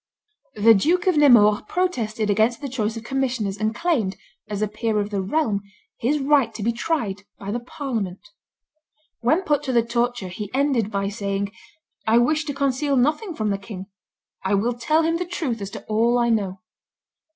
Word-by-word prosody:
The 220 +2 +6
Duke 335 - +2
of 370 -3 +3
Nemours 235 -8 +6
protested 230 - -1
against 220 +3 +2
the 285 - -5
choice 230 -4 -2
of 225 - -7
commissioners, 250 -6 -1
and 215 +1 0
claimed, 235 - 0 0.3
as 205 0 -2
a - - +1
peer 215 +1 -1
of 205 +1 -2
the 200 -2 -1
realm, 205 -1 0 0.4
his 275 +6 +1
right 275 -4 +3
to 215 - -5
be 235 - +2
tried 230 -6 -2 0.2
by 200 0 -6
the 240 - -1
parliament. 230 - -5 0.9
When 310 +10 +2
put 295 -5 +1
to 280 -3 -3
the 235 -2 +3
torture 235 -4 -1
he 205 +3 -6
ended 265 -6 +1
by 200 -1 -1
saying, 200 -1 -2 0.6
"I 225 +1 +5
wish 305 +6 +2
to 290 - -3
conceal 275 0 +1
nothing 310 - +1
from 215 -4 -1
the 200 - -1
king; 195 -1 -9 0.5
I 190 +1 +2
will 230 +5 +1
tell 305 +7 +1
him 330 +1 +1
the 360 - -1
truth 275 -11 -3
as 200 - -4
to - - -9
all 230 +3 +2
I 240 -1 +2
know." 195 -4 -1
230 Hz, 185 wpm, -23 LUFS, 205-280 Hz, 0.9 s, The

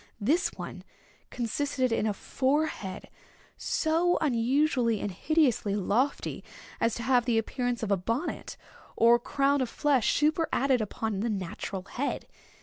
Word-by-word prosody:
This 310 - +2
one - - -7 0.5
consisted 255 +2 -1
in 225 -1 +1
a 210 - 0
forehead 260 -7 -1 0.5
so 330 +3 +1
unusually 250 -3 +2
and 205 - -3
hideously 250 - +1
lofty, 225 +8 0 0.4
as 230 -1 +1
to 235 - -5
have 250 -2 +3
the 235 -2 +2
appearance 245 +1 -1
of 210 - -2
a 200 - +4
bonnet 230 - -3 0.4
or 235 +1 +6
crown 275 +2 +1
of 255 - -1
flesh 280 -5 +2
superadded 295 -4 +2
upon 215 -1 -3
the 230 +3 -1
natural 190 -1 -4
head. 265 +8 -3
245 Hz, 135 wpm, -28 LUFS, 220-285 Hz, 0.5 s, or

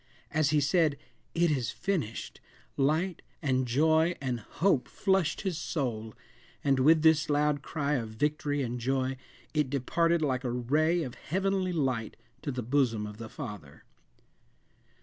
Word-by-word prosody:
As 155 -1 +2
he 155 0 +3
said, 150 0 +2 0.4
"It 170 -1 +3
is 130 -6 0
finished," 155 - -3 0.3
light, 160 +6 +1 0.2
and 130 -4 0
joy, 160 +6 +3
and 130 -3 -2
hope, 150 - +1
flushed 190 -5 +1
his 185 -5 -2
soul, 115 -10 -3 0.5
and 135 -2 +3
with 155 +4 +5
this 160 -1 +4
loud 145 -1 +2
cry 145 -1 -2
of 115 -6 -1
victory 145 +4 -1
and 120 0 -3
joy, 130 +2 0 0.4
it 150 -4 +1
departed 165 +5 +1
like 130 -3 0
a 125 - -1
ray 155 +8 +1
of 125 -4 -6
heavenly 190 +1 -1
light 130 -9 -1 0.2
to 150 - -3
the 125 -1 -3
bosom 120 -4 +1
of 105 0 -8
the 115 0 -7
Father. 105 - -8
145 Hz, 150 wpm, -29 LUFS, 125-160 Hz, 0.5 s, with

